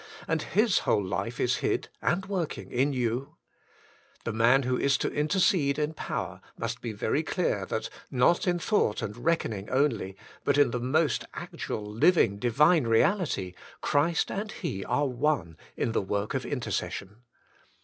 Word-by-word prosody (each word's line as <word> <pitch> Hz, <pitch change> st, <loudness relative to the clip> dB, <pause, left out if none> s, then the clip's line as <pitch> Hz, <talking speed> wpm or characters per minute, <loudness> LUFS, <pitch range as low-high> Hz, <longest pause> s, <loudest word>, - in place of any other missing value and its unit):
and 160 Hz, -1 st, 0 dB
His 210 Hz, +5 st, +2 dB
whole 105 Hz, -, +1 dB
life 115 Hz, +5 st, -3 dB
is 125 Hz, +1 st, +2 dB
hid -, -, -1 dB
and 190 Hz, +3 st, 0 dB
working 190 Hz, -5 st, -3 dB
in 135 Hz, +4 st, +2 dB
you? 125 Hz, 0 st, -2 dB, 0.9 s
The 115 Hz, -, -3 dB
man 120 Hz, +5 st, +4 dB
who 125 Hz, 0 st, 0 dB
is 140 Hz, +1 st, +2 dB
to -, -, -1 dB
intercede 150 Hz, -2 st, +2 dB
in 150 Hz, +1 st, -1 dB
power -, -, -4 dB, 0.2 s
must 115 Hz, +1 st, -4 dB
be 115 Hz, -, -3 dB
very 110 Hz, +8 st, 0 dB
clear 150 Hz, -, -1 dB
that, 110 Hz, -, -2 dB, 0.2 s
not 155 Hz, +10 st, +3 dB
in 175 Hz, -1 st, +2 dB
thought 175 Hz, -, +1 dB
and 105 Hz, -, -4 dB
reckoning 120 Hz, -7 st, -1 dB
only, 125 Hz, -8 st, 0 dB, 0.3 s
but 140 Hz, 0 st, +2 dB
in 145 Hz, -4 st, +5 dB
the 125 Hz, -, -1 dB
most 135 Hz, +3 st, +1 dB
actual, 105 Hz, -, -5 dB
living, 105 Hz, -, +3 dB
divine 145 Hz, +5 st, +4 dB
reality, 115 Hz, -, +2 dB, 0.3 s
Christ 160 Hz, +4 st, +1 dB
and 210 Hz, +2 st, -3 dB
he 95 Hz, -, -4 dB
are 145 Hz, -, +1 dB
one 125 Hz, -, 0 dB, 0.2 s
in -, -, 0 dB
the -, -, +1 dB
work 100 Hz, +2 st, -2 dB
of -, -, -2 dB
intercession. 100 Hz, +2 st, -3 dB
130 Hz, 160 wpm, -28 LUFS, 110-160 Hz, 0.9 s, in